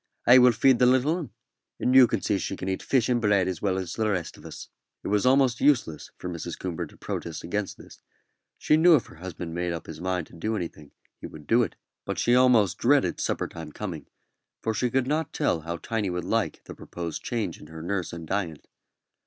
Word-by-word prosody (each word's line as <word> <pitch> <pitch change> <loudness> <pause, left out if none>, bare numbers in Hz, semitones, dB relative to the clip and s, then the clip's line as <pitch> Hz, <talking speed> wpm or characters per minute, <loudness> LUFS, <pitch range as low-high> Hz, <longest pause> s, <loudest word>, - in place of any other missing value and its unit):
"I 125 +2 +8
will 125 0 +7
feed 130 +2 +3
the 125 - +5
little 130 +5 +3
'un, 165 -6 -6 0.5
and 125 - +1
you'll 130 -2 +8
see 100 -3 0
she 95 - -4
can 95 - -6
eat 95 0 -2
fish 130 -4 +1
and 120 -1 +1
bread 100 -4 +3
as 95 -3 -3
well 95 -2 0
as 90 -3 -4
the 110 -1 0
rest 90 -6 -2
of - - -12
us." - - -9 0.4
It - - -4
was 105 +3 +2 0.3
useless 120 - +1
for - - -7
Mrs. 85 -1 -5
Coomber 85 -2 -4
to - - -19
protest 85 -2 -5
against 100 +3 -3
this; - - -15 0.6
she 155 - +3
knew 170 +1 +7
if 130 - 0
her - - -15
husband 85 -1 -7
made 85 0 -2
up 85 - -6
his 80 0 -9
mind 90 -2 -1
to - - -21
do 105 +7 -3
anything 80 -6 -6 0.3
he - - -7
would 75 -1 -12
do 115 +9 +4
it; 115 - -2 0.3
but - - -4
she 120 - +2
almost 125 -7 +4
dreaded 140 +2 +2
supper - - -1
time 80 -2 -9
coming, 85 -5 -6 0.6
for 110 - 0
she 125 +3 0
could 130 +1 +1
not 150 +3 -1
tell 80 - 0
how 85 +2 -4
Tiny 110 +1 -2
would 90 -1 -3
like - - -1
the - - -9
proposed 85 -2 -6
change 110 -8 -3
in - - -13
her 80 +1 -9
nurse 90 0 -2
and 85 -1 -7
diet. 85 -4 -3
95 Hz, 225 wpm, -26 LUFS, 85-120 Hz, 0.6 s, I